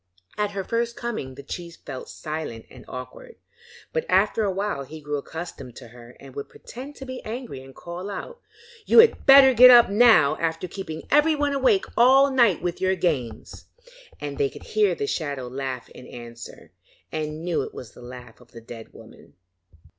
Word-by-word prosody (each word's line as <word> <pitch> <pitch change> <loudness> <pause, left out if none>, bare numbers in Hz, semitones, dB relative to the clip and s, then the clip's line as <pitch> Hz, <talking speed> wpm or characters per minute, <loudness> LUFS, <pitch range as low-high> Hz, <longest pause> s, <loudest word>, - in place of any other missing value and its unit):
At 210 -1 -1
her 195 -1 -3
first 235 +3 -2
coming 215 - -5
the 140 - -10
chief 170 +3 -7
felt 130 -3 -7
silent 150 -7 -6
and 125 - -14
awkward, 470 - -9 0.6
but 480 - 0
after 205 +3 +2
a 205 - +1
while 195 -5 -2
he 155 +4 -10
grew 150 -1 -3
accustomed 140 -5 -8
to 120 -3 -12
her 120 +1 -15
and 135 -1 -13
would 140 - -6
pretend 270 +4 -11
to 270 - -9
be 260 -1 -7
angry 225 - -7
and 135 0 -15
called 175 +3 -7
out: 475 - -7 0.5
'You - - +3
had 455 -8 +6
better 270 -1 +9
get 250 +2 +9
up 240 -4 +7
now, 205 -10 +5
after 165 +2 -2
keeping 165 -4 -7
everyone 295 -1 +3
awake 260 -8 +2
all 270 +3 +5
night 235 - +3
with 175 -1 -3
your 190 0 +2
games,' 155 -10 -3 0.5
and 145 -1 -6
they 140 - +2
could - - -13
hear 210 -4 +1
the 140 - -3
shadow 140 -4 -3
laugh 130 -1 -5
in 125 - -13
answer, 120 -1 -11 0.4
and 155 0 -4
knew 175 -2 0
it - - -6
was 115 -5 -9
the - - -16
laugh 125 0 -12
of - - -21
the 115 - -11
dead 115 0 -11
woman. - - -16
170 Hz, 185 wpm, -24 LUFS, -, 0.6 s, better